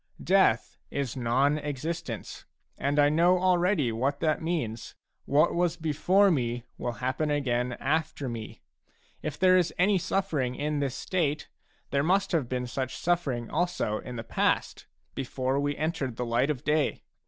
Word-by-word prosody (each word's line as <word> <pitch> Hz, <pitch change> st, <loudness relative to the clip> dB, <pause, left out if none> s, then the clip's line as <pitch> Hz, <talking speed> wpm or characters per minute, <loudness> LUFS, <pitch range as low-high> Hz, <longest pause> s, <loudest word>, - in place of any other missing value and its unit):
Death 185 Hz, -, +3 dB
is 140 Hz, -4 st, -3 dB
non 135 Hz, +4 st, +2 dB
existence, 150 Hz, -3 st, -5 dB, 0.3 s
and 140 Hz, +1 st, -1 dB
I 145 Hz, 0 st, +6 dB
know 170 Hz, +4 st, +4 dB
already 180 Hz, -, +2 dB
what 135 Hz, +5 st, -1 dB
that 155 Hz, -1 st, +1 dB
means. 150 Hz, -10 st, -3 dB, 0.3 s
What 145 Hz, +2 st, +3 dB
was 175 Hz, 0 st, +1 dB
before 175 Hz, +5 st, +3 dB
me 120 Hz, -5 st, -1 dB, 0.2 s
will 120 Hz, -, -2 dB
happen 130 Hz, +7 st, -2 dB
again 125 Hz, -4 st, 0 dB
after 150 Hz, +2 st, -1 dB
me. 115 Hz, -3 st, -7 dB, 0.6 s
If 155 Hz, -1 st, -4 dB
there 185 Hz, 0 st, +5 dB
is 175 Hz, -3 st, +3 dB
any 195 Hz, +2 st, +3 dB
sufFering 160 Hz, -9 st, -1 dB
in 150 Hz, 0 st, -1 dB
this 135 Hz, -2 st, -1 dB
state, 155 Hz, -4 st, -1 dB, 0.4 s
there 140 Hz, -, +2 dB
must 190 Hz, +6 st, +2 dB
have 155 Hz, -9 st, 0 dB
been 125 Hz, -1 st, -2 dB
such 130 Hz, +1 st, -3 dB
sufFering 140 Hz, -10 st, -1 dB
also 160 Hz, -10 st, 0 dB
in 125 Hz, -, -8 dB
the 115 Hz, -, -5 dB
past^ -, -, 0 dB, 0.3 s
before 130 Hz, 0 st, -1 dB
we 145 Hz, 0 st, -1 dB
entered 150 Hz, -5 st, -2 dB
the 125 Hz, -, -3 dB
light 120 Hz, +4 st, +1 dB
of 140 Hz, -5 st, -2 dB
day. 150 Hz, -1 st, +1 dB
145 Hz, 155 wpm, -28 LUFS, 125-170 Hz, 0.6 s, I